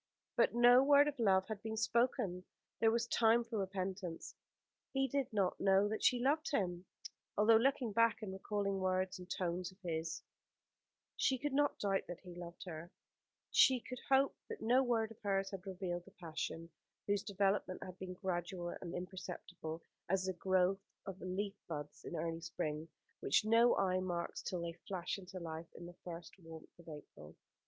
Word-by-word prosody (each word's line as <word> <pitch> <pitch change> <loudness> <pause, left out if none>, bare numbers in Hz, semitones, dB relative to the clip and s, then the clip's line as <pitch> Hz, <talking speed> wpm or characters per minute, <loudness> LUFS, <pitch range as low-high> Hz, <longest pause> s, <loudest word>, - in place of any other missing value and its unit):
But - - +3
no 245 +2 +8
word 285 +1 +7
of 290 -3 -3
love 190 -4 +4
had 215 -2 -5
been 220 0 -4
spoken. 225 -5 +1 0.4
There 225 - +5
was 230 +1 +1
time 235 0 +4
for 230 -2 -3
repentance. 190 -2 -4 0.6
He 270 0 +2
did 270 0 -1
not 195 -4 +1
know 195 +1 +5
that 220 - -3
she 250 - +5
loved 295 +5 +2
him. 180 - -1 0.5
Although, 220 +2 +7
looking 255 -1 +2
back, 230 +1 +3
and 190 -3 -4
recalling 200 0 -1
words 185 0 0
and 180 0 -10
tones 180 0 -2
of 185 - -20
his, 160 -2 -3 0.9
she 265 - +2
could 290 +2 -2
not 290 +1 +2
doubt 195 -1 0
that 175 -1 -7
he 180 -2 -10
loved 175 0 -8
her, 165 -1 -7 0.6
she 260 -1 +6
could 250 +1 -7
hope 270 +1 +4
that 445 - -5
no 250 +4 +4
word 230 -3 +1
of 225 - -14
hers 195 -1 0
had 195 0 -7
revealed 180 -2 -3
the 195 - -15
passion 165 0 -4 0.3
whose 205 -1 +1
development 195 -2 0
had 185 0 -9
been 185 -1 -6
gradual 175 -1 -3
and 170 -1 -5
imperceptible 180 -3 -6 0.3
as 190 0 +2
the 190 - -1
growth 185 +1 +2 0.2
of 190 -1 -6
the - - -7
leaf 195 +2 -2
buds 150 -3 -6
in - - -5
early 165 +1 -2
spring, 160 -1 -3 0.3
which 140 - +3
no 230 +2 +5
eye 185 -1 +2
marks 175 -2 -3
till 180 -4 -3
they 170 0 -3
flash 185 0 -2
into 185 0 -8
life 165 -1 -6
in 175 - -9
the 175 - -9
first 170 -1 -7
warmth 165 -1 -12
of 170 - -12
April. 80 - -11
190 Hz, 180 wpm, -36 LUFS, 175-225 Hz, 0.9 s, no